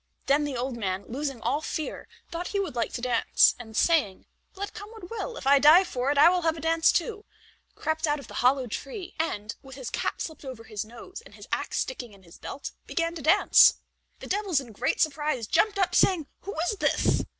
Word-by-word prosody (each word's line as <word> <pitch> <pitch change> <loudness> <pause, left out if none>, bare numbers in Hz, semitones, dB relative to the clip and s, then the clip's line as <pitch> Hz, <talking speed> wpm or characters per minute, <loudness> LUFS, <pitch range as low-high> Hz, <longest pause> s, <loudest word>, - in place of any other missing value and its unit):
Then 290 +2 +3
the 280 -3 -3
old 245 0 -3
man, 190 -3 -3
losing 270 -1 -4
all 295 - 0
fear, 315 0 -5 0.2
thought 345 +1 -4
he 400 - -2
would 380 -10 -3
like 235 -1 -1
to 240 - -4
dance, 245 -2 +4
and 220 -2 -8
saying, 295 - +2 0.3
"Let 400 +1 -5
come 410 - -9
what 440 -5 -12
will, 465 +1 -5
if - - -8
I 280 +1 +6
die 310 +6 +8
for 260 -7 -2
it, 285 - +1
I 290 - +8
will 360 +1 +3
have 325 -1 0
a - - -6
dance, 325 +1 +3
too," 430 -3 -2 0.5
crept 315 0 -1
out 295 0 +1
of 280 - -11
the - - -12
hollow 255 +1 +3
tree 275 - -6
and, 215 -9 -2
with 265 -1 -12
his 260 -3 -7
cap - - -2
slipped 315 -2 -6
over 260 -4 -8
his 215 -2 -5
nose 240 - -11
and - - -16
his - - -12
ax - - -2
sticking 245 -4 -5
in 195 -1 -18
his 170 -1 -16
belt, 280 - -7 0.2
began 330 0 -1
to 335 - -7
dance. 310 - +6 0.5
The - - -7
devils 390 -6 +1
in 250 -4 -9
great 210 - -1
surprise 295 -5 0
jumped 420 - +2
up, 370 -2 +1
saying, 360 -4 +3 0.2
"Who 400 - -5
is 380 +5 -1
this?" - - +2
295 Hz, 225 wpm, -27 LUFS, 245-345 Hz, 0.5 s, die